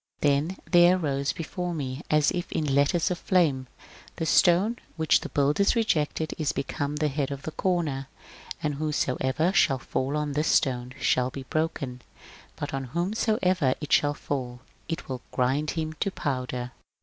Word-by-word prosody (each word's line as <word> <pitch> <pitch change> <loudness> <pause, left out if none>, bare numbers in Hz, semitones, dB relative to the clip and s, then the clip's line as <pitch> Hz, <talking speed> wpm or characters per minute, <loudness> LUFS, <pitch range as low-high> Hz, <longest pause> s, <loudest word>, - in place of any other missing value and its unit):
Then 150 +5 +1
there 175 +1 +6
arose 140 -5 -1
before 175 +1 -4
me 135 -2 -4
as 150 -1 +4
if 175 0 -4
in 155 - -1
letters 155 +6 +2
of 180 - -2
flame: 150 -9 +2 0.2
— - - -20
The 165 - -2
stone 195 +8 +4 0.2
which 160 -1 +4
the - - -7
builders 145 +8 +2
rgected 160 -8 0
is 155 -3 0
become 145 +1 -3
the 150 0 +1
hecui 140 -1 -1
of 140 -1 -6
the 160 - -4
comer. 155 -8 -1 0.6
And 150 -2 -1
whosoecer 150 +2 0
shall 135 -8 +4
fall 130 +3 -2
on 150 -1 -1
this 150 +3 0
stone 125 -1 +1
shall 125 0 +2
be 135 +1 -7
broken; 140 -4 -2 0.5
but 145 -1 -5
on 135 -1 -2
whomsoever 180 - +1
it 150 - -3
shall 145 0 +3
fall 125 -4 -4 0.3
it 165 - -3
unit 130 -2 -4
grind 135 +4 +1
him 155 -1 -2
to - - +1
powder. 125 -6 -3
150 Hz, 165 wpm, -27 LUFS, 135-170 Hz, 0.6 s, there